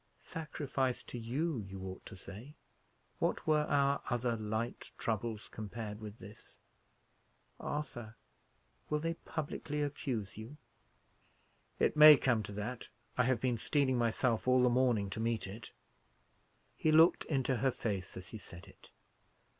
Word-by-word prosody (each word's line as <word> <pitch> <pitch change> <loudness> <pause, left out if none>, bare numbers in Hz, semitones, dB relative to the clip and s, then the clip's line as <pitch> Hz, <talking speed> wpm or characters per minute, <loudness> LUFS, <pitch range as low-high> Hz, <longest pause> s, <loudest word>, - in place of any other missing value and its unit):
"Sacrifice 140 -5 -2
to 120 - -7
you, 135 +5 -1
you 95 -2 -7
ought 95 0 -7
to - - -9
say. 110 +11 -10 0.6
What - - 0
were 150 -1 +3
our 140 0 +3
other 120 -1 0
light 110 +2 -3
troubles, 110 -1 -2
compared 110 0 -6
with 105 0 -8
this? 105 0 -13 1.0
Arthur, 120 -7 -4 0.7
will 150 - +2
they 165 +2 -1
publicly 150 -2 -4
accuse 125 -8 -3
you?" 120 +7 -9 1.2
"It - - +2
may 150 -1 +11
come 120 -5 +2
to 105 - -7
that; 110 +5 -5 0.3
I 125 - +3
have 130 -2 +2
been 125 -1 0
steeling 130 0 +2
myself 115 0 +1
all 130 0 +5
the 125 - +5
morning 120 -5 +2
to 105 - -4
meet 115 0 0
it." 105 +4 -8 1.0
He 155 - +2
looked 160 +2 +6
into 135 -3 +1
her 135 +4 +2
face 100 -6 -3
as 90 -1 -8
he 110 - -7
said 85 -3 -11
it. - - -17
120 Hz, 145 wpm, -34 LUFS, 110-140 Hz, 1.2 s, may